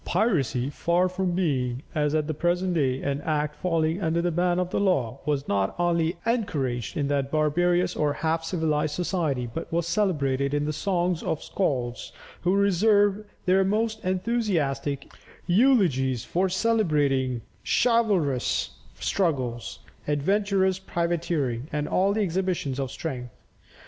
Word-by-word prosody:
[Illustration: 215 +7 +1
Norman 180 - +3
Ships.] 130 -5 -2
Piracy, 125 +3 -1
far 175 +5 +1
from 185 0 -1
being, 135 -8 -1
as 150 -1 +1
at 155 -1 +1
the 155 - -2
present 175 +4 0
day, 135 -5 0
an 140 0 -1
act 150 -1 -1
falling 165 0 0
under 165 -1 +1
the 175 +1 0
ban 175 +1 +1
of 180 0 -1
the - - 0
law, 140 - +1
was 145 -1 0
not 100 -1 0
only 170 -1 +1
encouraged 155 - -1
in 145 -2 0
that 140 -1 0
barbarous 175 +4 +1
or 150 -2 +1
half 160 +2 -1
civilized 155 -3 0
society, 165 -8 -1
but 165 - -5
was 170 0 0
celebrated 145 -8 0
in 145 0 0
the 155 - -1
songs 175 -1 0
of - - -1
the - - -13
Skalds, 125 -10 -2 0.3
who 180 +2 +2
reserved 205 +1 +3 0.2
their 190 +1 +4
most 220 +3 0
enthusiastic 180 - -1 0.3
eulogies 175 - +3
for 185 +2 0
celebrating 150 - +1 0.2
chivalrous 205 - +1 0.3
struggles, 130 -11 -1 0.3
adventurous 190 +5 +1
privateering, 170 -8 -1
and 150 -1 -2
all 200 +3 +2
exhibitions 180 -8 -1
of 135 -1 -2
strength. 130 -3 -5
165 Hz, 145 wpm, -26 LUFS, 140-185 Hz, 0.3 s, their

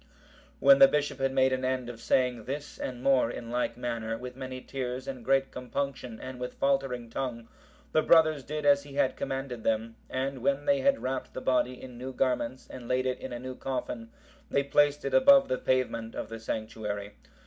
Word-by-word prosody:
When 275 - +7
the 275 - +10
bishop 145 - -1
had 135 0 +1
made 130 0 +3
an 130 0 -1
end 130 -1 -1
of 120 -1 -8
saying 125 -3 +1
this 140 +3 -6
and 125 -1 -5
more 135 -4 +4
in 120 -1 -6
like 120 -1 -1
manner, 115 -2 -3
with 125 +1 -8
many 130 -1 -6
tears 130 0 -5
and 130 -3 -6
great 135 +2 +2
compunction 125 -2 -4
and 130 -1 -7
with 125 0 -5
faltering 135 -3 0
tongue, 115 -1 -4 0.4
the 155 - +4
brothers 155 -3 +5
did 150 +2 -4
as 140 -1 +6
he 140 -1 -12
had 130 - +2
commanded 135 -4 -4
them, 115 +1 -1
and 135 +1 -2
when 140 +2 +1
they 280 -1 +3
had 275 0 +2
wrapped 130 0 -3
the - - -2
body 125 -1 +1
in 125 -2 -10
new 130 +1 -5
garments, 130 -1 -1
and 125 -2 -9
laid 130 +1 +1
it 130 -1 -1
in 130 - -7
a 120 - -4
new 130 +1 -6
coffin, 125 -3 -4 0.4
they 140 - +2
placed 145 +1 +2
it 135 - -2
above 275 - +7
the 130 - 0
pavement 115 -3 0
of - - -5
the 115 0 -6
sanctuary. 110 -2 -4
130 Hz, 205 wpm, -29 LUFS, 120-135 Hz, 0.4 s, the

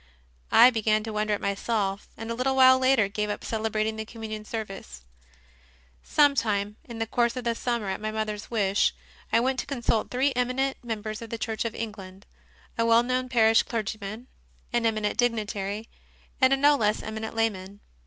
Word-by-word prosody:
I 250 - +8
began 215 -2 +1
to 220 -1 -5
wonder 210 0 0
at - - -8
myself, 200 0 -1
and 225 +1 -5
a - - 0
little 260 +3 0
while 260 0 +7
later 260 -5 +3
gave 210 +1 -3
up 205 - -4
celebrating 220 0 -1
the 220 - -3
Communion 220 -1 -7
service. 195 - -7 1.0
3. - - -20
Sometime 215 -8 +2
in 235 -2 -8
the 225 - -1
course 235 +1 +1
of 255 - -4
the 235 -1 0
summer, 235 -2 -2
at 190 +2 -3
my 215 - -2
mother 215 -1 -2
s 210 - -9
wish, 200 -4 +1 0.4
I - - +4
went 255 +2 0
to - - -4
consult 235 -5 -1
three 265 +2 +1
eminent 255 +2 -1
members 215 -2 -4
of 230 - -8
the 230 - -4
Church 225 0 -3
of 230 - -3
England 200 -3 -7 0.5
a 230 - +3
well 230 +1 +5
known 255 +1 -1
parish 225 -2 +5
clergyman, 215 0 -5 0.5
an 235 -1 +2
eminent 215 -2 -1
dignitary, 215 -3 -1 0.5
and 260 0 +6
a 270 - +4
no 290 +2 +5
less 215 -5 0
eminent 220 +1 -5
layman. 205 -3 -2
225 Hz, 185 wpm, -26 LUFS, 210-240 Hz, 1.0 s, I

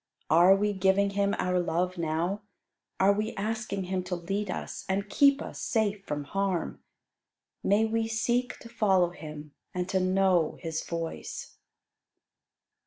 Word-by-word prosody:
Are 175 +4 +7
we 205 +1 +1
giving 195 +1 +2
Him 200 0 +1
our 180 0 +1
love 175 +1 -1
now? 170 +5 -1 0.6
Are 195 +1 +5
we 215 +2 -2
asking 215 -1 -2
Him 185 0 -2
to 180 0 -2
lead 195 +4 -3
us, - - -5
and 195 +2 0
keep 280 +5 +4
us - - -8
safe 210 -3 0
from 145 -1 -3
harm? 195 +2 -2 0.8
May 205 +3 +3
we 225 0 0
seek 240 +2 0
to - - -10
follow 195 -6 +2
Him 150 -3 -9 0.2
and 180 0 -1
to 190 0 +2
know 185 -3 +2
His 160 -1 -3
voice. 165 -1 -5
195 Hz, 145 wpm, -28 LUFS, 175-210 Hz, 0.8 s, Are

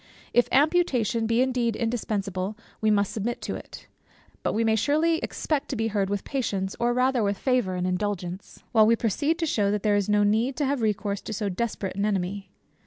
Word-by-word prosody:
If 245 - +4
amputation 260 - +2
be 230 +2 +3
indeed 245 -4 0
indispensable, 205 -4 -2 0.2
we 220 - +3
must 205 -2 +2
submit 230 +3 -2
to - - -3
it; - - -9 0.6
but - - -1
we 225 - +1
may 220 -1 +3
surely 315 +7 +2
expect 300 -4 -2
to - - -2
be 225 -1 0
heard 200 -2 0
with 205 -1 -2
patience, 200 -8 -2
or 240 0 +2
rather 250 0 +2
with 200 -1 0
favour 250 -8 +1
and 180 0 -1
indulgence, 185 -1 -3
while 220 -2 +5
we 230 - +5
proceed 285 - 0
to 335 - -1
shew 210 -9 +1
that 205 0 -1
there 210 -1 +3
is 205 0 0
no 205 0 +4
need 225 +6 +2
to 295 - 0
have 275 -2 0
recourse 205 -2 -1
to - - -6
so 210 -1 -2
desperate 195 -1 -3
an 200 +1 0
enemy. 195 -1 -2
220 Hz, 205 wpm, -26 LUFS, 200-245 Hz, 0.6 s, while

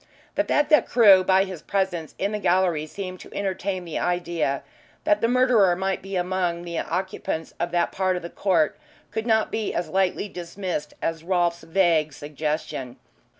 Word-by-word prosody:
The - - +1
fact 295 0 +1
that 300 - +6
Crewe 200 -6 +7
by 190 +1 +4
his 185 -5 -7
presence 185 -5 -2
in 200 +2 -1
the 210 - -2
gallery 175 -5 +2
seemed 185 +1 -6
to - - -12
entertain 190 -1 -2
the 165 - -3
idea 170 -5 -1 0.4
that 310 -1 +2
the 230 - +3
murderer 240 -7 +4
might 190 +1 -1
be 195 +1 -6
found 180 - +2
among 180 -2 -1
the 170 -1 -3
occupants 180 -2 -3
of 170 - 0
that 175 -1 +1
part 185 -1 0
of 180 - -4
the 170 - -5
court 175 -6 +1 0.3
could 220 +1 -3
not 220 -1 +2
be 220 -1 -2
as 175 - -2
lightly 190 +1 +1
dismissed 175 -4 -5
as 165 -1 -2
Rolfe's 175 -1 +1
vague 160 -3 +2
suggestion. 145 -3 -4
185 Hz, 180 wpm, -24 LUFS, 170-195 Hz, 0.4 s, Crewe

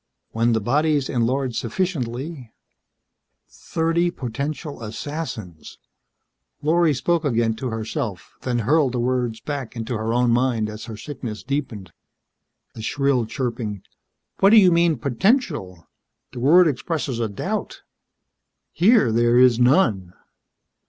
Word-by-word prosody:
When 115 +1 +1
the 110 - +2
bodies 145 +5 +1
enlarge 125 +1 0
sufficiently 130 - -3 0.5
..." - - -55
"Thirty 165 - -1
potential 140 +1 -5
assassins...." 110 - -6 0.9
Lorry 160 0 +3
spoke 170 +5 0
again 115 -5 +1
to 130 - -3
herself, 110 - -5
then 125 -2 -1
hurled 145 -1 +3
the 125 - -1
words 120 -2 -1
back 135 -3 -5
into 115 +1 -4
her 110 +1 -2
own 120 0 +2
mind 120 -3 +1
as 110 +1 -8
her 110 -2 -8
sickness 115 -4 -7
deepened. 120 - -4 0.8
The 110 - -9
shrill 135 0 0
chirping: 115 -5 -4 0.6
"What 195 - +6
do 225 - +7
you 190 -4 +7
mean, 170 -2 +3
potential? 140 - 0 0.4
The 125 - -8
word 165 +8 +6
expresses 140 -2 -2
a 115 -2 -1
doubt. 100 - -4 0.9
Here 180 - +4
there 120 +1 +3
is 125 -2 +5
none." 120 - +2
125 Hz, 125 wpm, -22 LUFS, 115-150 Hz, 0.9 s, do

